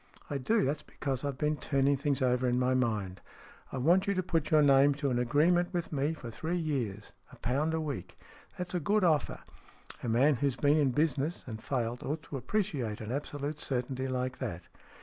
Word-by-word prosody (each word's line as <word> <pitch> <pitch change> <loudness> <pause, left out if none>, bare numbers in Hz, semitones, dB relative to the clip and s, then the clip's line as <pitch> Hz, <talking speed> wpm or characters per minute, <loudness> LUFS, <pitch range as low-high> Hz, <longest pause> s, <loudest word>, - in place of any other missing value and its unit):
" - - -26
I 140 - -1
do. 215 - +2
That's 145 +3 -1
because 135 -3 -4
I've 140 -2 -2
been 150 +1 0
turning 140 +1 +2
things 140 -1 0
over 125 0 +2
in 125 0 +2
my 125 0 +2
mind. 110 -7 -1 0.5
I - - -4
want 175 +9 +3
you 200 - +1
to 185 - 0
put 165 -3 0
your 155 -1 +5
name 140 0 +5
to 140 -1 -1
an 120 - +1
agreement 170 +8 +3
with 175 -3 -3
me 145 +2 +1
for 120 -6 -8
three 160 +9 -2
years. 125 - -3 0.2
A - - -12
pound 145 +7 0
a - - 0
week. 140 - -5 0.4
That's 180 0 -4
a 180 - +1
good 205 +6 +2
offer. 155 -6 +2 0.6
A 120 - -3
man 130 +5 +4
who's 140 0 0
been 145 +1 +3
in 145 -3 +3
business, 150 +3 0
and 110 -3 -7
failed, 120 -2 -2
ought 155 +2 -3
to 140 - -6
appreciate 135 - -2
an 110 +1 -5
absolute 145 +2 -3
certainty 130 0 -2
like 130 0 -2
that." 85 0 -5
140 Hz, 210 wpm, -31 LUFS, 125-155 Hz, 0.6 s, your